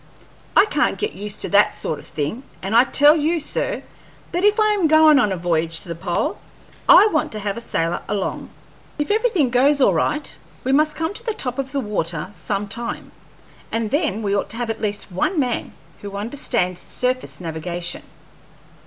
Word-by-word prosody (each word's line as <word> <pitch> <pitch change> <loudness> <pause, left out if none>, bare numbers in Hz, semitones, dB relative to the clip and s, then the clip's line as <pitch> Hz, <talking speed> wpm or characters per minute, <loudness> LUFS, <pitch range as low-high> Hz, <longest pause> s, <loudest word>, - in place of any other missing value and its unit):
I - - +8
can't - - 0
get 425 +1 -2
used 210 0 -6
to - - -3
that 205 +1 +4
sort 155 - -3
of - - -13
thing, 150 - -3 0.2
and 195 +4 -1
I 240 +2 +7
tell 290 +3 +5
you, 325 +2 +1
sir, 410 +10 -3 0.5
that 355 +1 -1
if 420 +2 +4
I 430 0 +4
am 395 -6 +2
goin' 315 -1 +6
on 210 -6 +2
a 190 - -1
voyage 165 -1 -1
to - - -12
the - - -2
pole, 180 - -2 0.5
I - - +9
want 310 - 0
to 215 - -4
have 200 -1 -2
a 235 - -5
sailor 170 -6 -1
along. 200 -2 -3 0.5
If 295 +5 -1
everything 415 - +2
goes 275 +4 +4
all 265 - +4
right, 300 0 0 0.3
we 260 - 0
must 305 +2 +3
come 320 +3 -2
to 455 - -8
the 450 -3 -2
top 250 - -3
of 270 -1 -3
the 280 - -1
water 175 -6 -3
some 200 +3 -3
time, 235 +2 -5 0.6
and 225 -2 -2
then 290 - 0
we 200 -1 0
ought 200 - -1
to 225 - -5
have 235 -2 -1
at 225 - -7
least 205 -2 -3
one 300 - 0
man 250 -4 -1 0.3
who 200 -1 -7
understands 210 -5 -1
surface 255 +1 -2
navigation." 170 +1 -4
235 Hz, 195 wpm, -21 LUFS, 195-300 Hz, 0.6 s, I